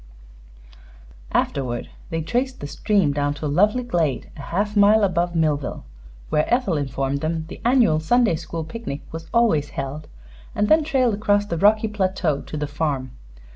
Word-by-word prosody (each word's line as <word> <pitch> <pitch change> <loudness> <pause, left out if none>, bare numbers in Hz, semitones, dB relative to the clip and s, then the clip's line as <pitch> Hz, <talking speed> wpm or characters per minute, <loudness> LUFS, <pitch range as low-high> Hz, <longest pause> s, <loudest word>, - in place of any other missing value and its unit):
Afterward 125 -3 -1 0.2
they 165 -2 -2
traced 255 - -1
the - - -6
stream 155 +2 +1
down 145 0 0
to 150 - -6
a - - +1
lovely 210 - +2
glade 170 - -1
a 145 - -9
half 205 +8 -2
mile 210 +1 +5
above 175 -2 0
Millville, 150 - -1 0.4
where 150 - +1
Ethel 240 -8 +2
informed 135 0 -2
them 160 0 -2
the - - -9
annual 235 -11 +4
Sunday 225 +4 +3
school 165 +1 -5
picnic 160 -5 -6
was 165 0 -7
always 210 -12 +2
held, 140 +2 -4 0.5
and 210 - +1
then 315 0 +5
trailed 265 -6 +2
across 205 0 +1
the 170 - -3
rocky 215 +3 +4
plateau 185 -7 -1
to 155 - -7
the 150 - -1
farm. 145 -3 -2
165 Hz, 165 wpm, -22 LUFS, 145-215 Hz, 0.5 s, mile